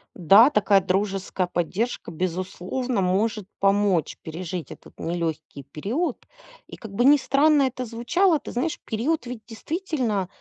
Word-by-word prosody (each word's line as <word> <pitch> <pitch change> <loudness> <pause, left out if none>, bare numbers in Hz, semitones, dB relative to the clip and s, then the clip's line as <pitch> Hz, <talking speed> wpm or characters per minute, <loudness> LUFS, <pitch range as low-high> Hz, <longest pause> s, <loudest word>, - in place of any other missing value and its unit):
Да, 200 - +7
такая 205 -6 +3
дружеская 190 -1 -1
поддержка, 180 +3 -2
безусловно, 185 +7 -3
может 200 +2 0
помочь 195 -5 +2
пережить 170 +1 -6
этот - - -14
нелегкий 165 -4 -4
период. 225 - -3 0.4
И - - -10
как 220 - -10
бы 240 +5 +1
ни 290 +2 +7
странно 285 +2 +3
это 255 -1 -2
звучало, 315 - +1
ты - - -9
знаешь, 270 +7 -2
период 255 +8 -1
ведь, 240 -2 -7
действительно, 250 - -2
210 Hz, 135 wpm, -24 LUFS, 185-255 Hz, 0.4 s, Да